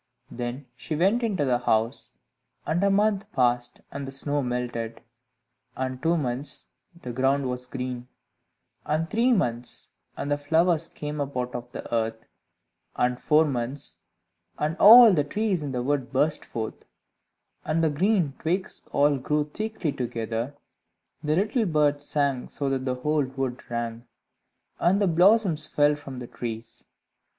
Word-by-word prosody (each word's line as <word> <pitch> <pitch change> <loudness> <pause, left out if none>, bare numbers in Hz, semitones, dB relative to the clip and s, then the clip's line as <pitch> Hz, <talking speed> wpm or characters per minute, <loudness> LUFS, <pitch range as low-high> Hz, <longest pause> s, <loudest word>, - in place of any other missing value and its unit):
Then 120 +3 -5
she 155 +5 -4
went 195 +9 +3
into 200 -10 0
the 125 -2 +2
house; 115 -1 0 0.5
and 175 +4 0
a 200 - +4
month 205 0 +1
passed, 120 -1 +1
and 140 -1 -5
the - - -6
snow 145 +1 -1
melted; 120 -2 -3 0.8
and 130 0 -3
two 165 +1 +2
months, 135 0 -2 0.3
and 170 - -20
the 125 - -5
ground 135 +2 +1
was 125 0 -4
green; 125 -1 -5 0.8
and 155 +2 0
three 235 +7 +2
months, 120 - -1 0.3
and 145 - -3
the 145 - +1
flowers 165 +2 +2
came 150 -1 -5
up 140 -2 -4
out 125 0 -2
of 120 0 -6
the - - -7
earth; 110 -1 -1 0.7
and 125 0 0
four 155 +1 +4
months, 130 0 -3 0.6
and 155 +2 -1
all 230 0 +10
the 150 -4 +3
trees 200 +3 -1
in 145 -2 -4
the 125 -1 -2
wood 135 -1 -1
burst 150 +3 +1
forth, 110 -1 -5 0.8
and 165 +1 0
the 160 - +3
green 175 -1 +2
twigs 180 +4 -2
all 145 -1 +3
grew 150 +3 -1
thickly 215 -7 -2
together; 120 +1 -3 0.7
the 150 0 +1
little 215 +4 +1
birds 145 -3 +2
sang 140 -4 0
so 140 -2 -2
that 130 -1 -1
the 130 -1 0
whole 150 +3 +1
wood 130 -1 -4
rang, 120 0 -4 0.7
and 185 +3 +3
the 205 - +3
blossoms 180 -2 +4
fell 145 0 +3
from 140 -3 -8
the 125 - -6
trees. 115 -1 -7
145 Hz, 155 wpm, -26 LUFS, 125-165 Hz, 0.8 s, all